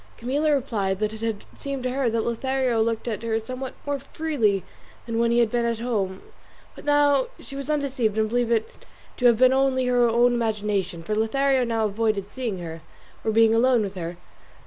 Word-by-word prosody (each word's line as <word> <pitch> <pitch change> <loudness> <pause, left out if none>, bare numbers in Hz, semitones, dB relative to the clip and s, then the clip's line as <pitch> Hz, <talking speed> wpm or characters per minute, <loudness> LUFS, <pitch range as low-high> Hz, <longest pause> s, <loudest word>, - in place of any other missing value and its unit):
Camilla 285 +6 0
replied 210 -8 -1
that 215 0 -1
it 220 - -8
had 225 -2 -3
seemed 275 -2 -5
to 255 - -1
her 260 -2 +1
that 225 0 -1
Lothario 255 0 0
looked 225 +1 -1
at 220 -4 -2
her 225 -1 0
somewhat 255 +4 -6
more 285 -1 -1
freely 270 - 0 0.4
than 230 -1 -2
when 235 0 +3
he 235 - +2
had 235 -2 +3
been 240 -1 +1
at 235 -1 0
home; 205 -5 -2 0.5
but - - -12
that - - +4
now 290 +10 +4
she 275 - -10
was 275 +1 -5
undeceived 270 -8 0
and 220 0 +2
believed 240 0 0
it 225 -1 +2 0.5
to 250 - +4
have 235 -2 +5
been 255 +2 +5
only 265 -1 +2
her 245 -1 +3
own 240 +2 +4
imagination, 210 -7 -1
for 215 - -3
Lothario 260 +5 +2
now 225 -2 0
avoided 210 -1 -1
seeing 240 -7 -3
her, 165 -2 -7 0.4
or - - 0
being 225 0 +5
alone 240 0 +4
with 200 -1 -4
her. 175 -2 -5
230 Hz, 205 wpm, -24 LUFS, 215-260 Hz, 0.5 s, have